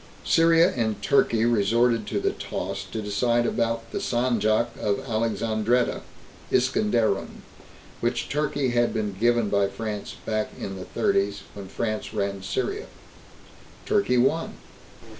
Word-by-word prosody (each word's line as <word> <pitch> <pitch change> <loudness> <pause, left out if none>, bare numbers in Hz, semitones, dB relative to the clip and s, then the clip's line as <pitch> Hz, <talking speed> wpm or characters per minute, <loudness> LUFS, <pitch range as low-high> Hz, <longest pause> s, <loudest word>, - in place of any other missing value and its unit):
Syria 165 +1 +5
and 110 -3 -1
Turkey 115 -5 +3
resorted 115 +1 +2
to - - -1
the - - +1
toss - - -5
to 110 - -4
decide 120 +4 +1
about 115 -1 -1
the - - -2
Sanjak 120 -1 +1
of 100 -1 0
Alexandretta 115 0 0 0.5
(Iskanderun) 110 -2 +1 0.6
which - - -1
Turkey 145 -2 0
had 120 -1 +1
been 105 -2 -1
given 115 +2 +2
by 100 -1 +3
France 105 0 -5
back 110 -1 -1
in 95 - -5
the 95 -1 -7
Thirties, 100 +1 0
when 100 -2 -8
France 110 +2 -3
ran 100 -1 -2
Syria. 400 - -3 1.0
Turkey 200 -12 +2
won. 140 +7 +1
115 Hz, 125 wpm, -25 LUFS, 105-120 Hz, 1.0 s, Syria